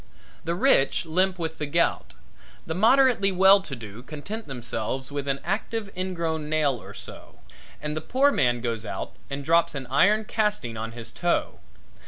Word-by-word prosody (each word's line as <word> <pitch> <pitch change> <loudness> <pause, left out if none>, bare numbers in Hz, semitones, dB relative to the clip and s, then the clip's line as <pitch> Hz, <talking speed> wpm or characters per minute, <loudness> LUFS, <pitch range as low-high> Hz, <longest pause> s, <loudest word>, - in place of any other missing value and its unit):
The 170 +1 -1
rich 175 - +3
limp 185 +3 +1
with 160 -2 -4
the 150 - -2
gout, 145 - 0 0.5
the 160 - -3
moderately 230 +1 +4
well 190 +2 +6
to 155 -8 -7
do 110 -1 -10
content 160 - -7
themselves 130 0 -4
with 140 -1 -4
an 135 0 0
active 205 +1 -3
ingrown 165 -4 -3
nail 150 -6 +1
or - - -11
so, - - -11 0.5
and 150 0 -3
the 155 - -3
poor 270 - +3
man 120 - +1
goes 115 -3 -2
out - - -5 0.2
and 140 0 -5
drops 165 -1 +3
an 135 -2 -4
iron 210 +10 +4
casting 210 - -1
on 115 +1 -5
his 115 -1 -7
toe. 175 -1 -1
160 Hz, 170 wpm, -25 LUFS, 135-195 Hz, 0.5 s, well